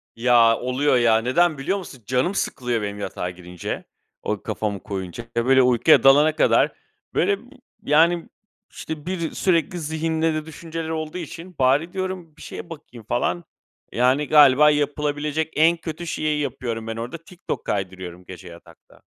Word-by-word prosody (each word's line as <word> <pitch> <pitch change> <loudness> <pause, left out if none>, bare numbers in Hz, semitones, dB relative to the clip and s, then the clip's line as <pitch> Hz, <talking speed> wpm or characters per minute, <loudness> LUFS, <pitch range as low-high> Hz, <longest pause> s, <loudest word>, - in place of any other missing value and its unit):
Ya, 115 -1 +4
oluyor 125 +2 +1
ya, 115 -2 +4
neden 150 +7 +2
biliyor 175 +9 -1
musun? 135 - -10
Canım 130 - 0
sıkılıyor 120 - -1
benim 100 0 -4
yatağa 90 -3 -4
girince, 90 -1 -7 0.4
o - - -3
kafamı 100 -3 -3
koyunca. 95 +3 -6
Ya, 115 0 +1
böyle, 130 0 +5
uykuya 125 +5 +5
dalana 145 +3 +6
kadar, - - +3 0.4
böyle, 200 +3 +2 0.5
yani, 165 +3 +3 0.4
işte, 155 -2 -7
bir 175 -3 -3
sürekli 175 -1 0
zihinde 160 +1 -1
de 155 0 -3
düşünceler 160 0 -6
olduğu 160 +1 -4
için, 170 +2 -8
"Bari," 140 +7 +2
diyorum, 185 -4 -4
"bir - - -15
şeye - - -8
bakayım," 125 -8 -11
falan. 90 -7 0 0.5
Yani, 130 +5 +2
galiba 150 0 +7
yapılabilecek 150 +1 -1
en 165 +2 +4
kötü 165 0 -7
şeyi 155 -1 -1
yapıyorum 115 -4 -4
ben 115 - -4
orada. 120 +8 -5
TikTok 180 +1 -6
kaydırıyorum 95 -3 -4
gece 95 0 -11
yatakta. 85 0 -16
145 Hz, 150 wpm, -23 LUFS, 115-160 Hz, 0.5 s, galiba